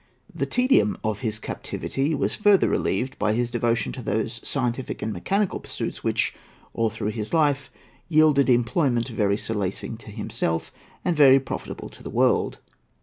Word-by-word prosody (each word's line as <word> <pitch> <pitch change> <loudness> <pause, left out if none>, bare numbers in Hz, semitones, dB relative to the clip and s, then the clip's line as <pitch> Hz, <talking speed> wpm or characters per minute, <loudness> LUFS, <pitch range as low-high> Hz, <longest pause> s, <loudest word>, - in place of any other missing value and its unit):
The - - -2
tedium 250 -4 +3
of 110 -2 -1
his 110 -4 -2
captivity 135 +6 -3
was - - 0
further 205 -2 +4
relieved 130 +1 -1
by 105 +1 +2
his 120 +1 0
devotion 120 -1 0
to 130 - -7
those 110 +1 -2
scientific 125 -1 -2
and 110 - -2
mechanical 195 - 0
pursuits - - -5
which, - - +1 0.4
all 115 -1 +1
through 110 0 -3 0.2
life, 145 -4 +2 0.4
yielded 155 -4 +4
employment 120 0 +2
very 105 -3 +1
solacing 105 0 -3
to 115 - -13
himself, 105 -6 -2 0.3
and 175 - +2
very 135 -3 +7
profitable 135 - -6
to - - -16
the - - -7
world. - - +2
120 Hz, 150 wpm, -24 LUFS, 110-145 Hz, 0.4 s, very